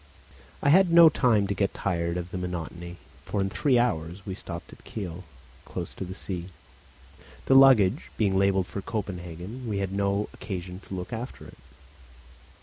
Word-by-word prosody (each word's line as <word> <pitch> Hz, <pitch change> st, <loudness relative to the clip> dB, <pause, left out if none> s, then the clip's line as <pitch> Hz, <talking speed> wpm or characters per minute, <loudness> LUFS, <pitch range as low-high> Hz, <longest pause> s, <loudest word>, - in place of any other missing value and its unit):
I -, -, +4 dB
had 185 Hz, +4 st, +6 dB
no 170 Hz, -1 st, +9 dB
time 120 Hz, -8 st, +3 dB
to 100 Hz, -, -1 dB
get 100 Hz, 0 st, -1 dB
tired 85 Hz, -2 st, -1 dB
of 90 Hz, 0 st, -5 dB
the -, -, -4 dB
monotony; 85 Hz, 0 st, -5 dB, 0.3 s
for 105 Hz, -, -3 dB
in 95 Hz, 0 st, 0 dB
three 135 Hz, +2 st, +2 dB
hours 90 Hz, -5 st, -1 dB
we 95 Hz, -, -4 dB
stopped 85 Hz, -3 st, -8 dB
at -, -, -16 dB
Kiel, 90 Hz, -4 st, -6 dB, 0.4 s
close -, -, -6 dB
to -, -, -6 dB
the 95 Hz, 0 st, -7 dB
sea. 90 Hz, -2 st, -5 dB, 1.0 s
The -, -, +3 dB
luggage 130 Hz, -8 st, +6 dB
being 100 Hz, -3 st, +2 dB
labelled 95 Hz, -1 st, +3 dB
for 100 Hz, -, -6 dB
Copenhagen, 95 Hz, +3 st, -5 dB
we 105 Hz, -, -1 dB
had 95 Hz, -1 st, -2 dB
no 100 Hz, +1 st, 0 dB
occasion 90 Hz, -2 st, -6 dB
to 95 Hz, -, -5 dB
look 90 Hz, +5 st, -6 dB
after 120 Hz, +3 st, -6 dB
it. -, -, -14 dB
95 Hz, 170 wpm, -27 LUFS, 90-110 Hz, 1.0 s, no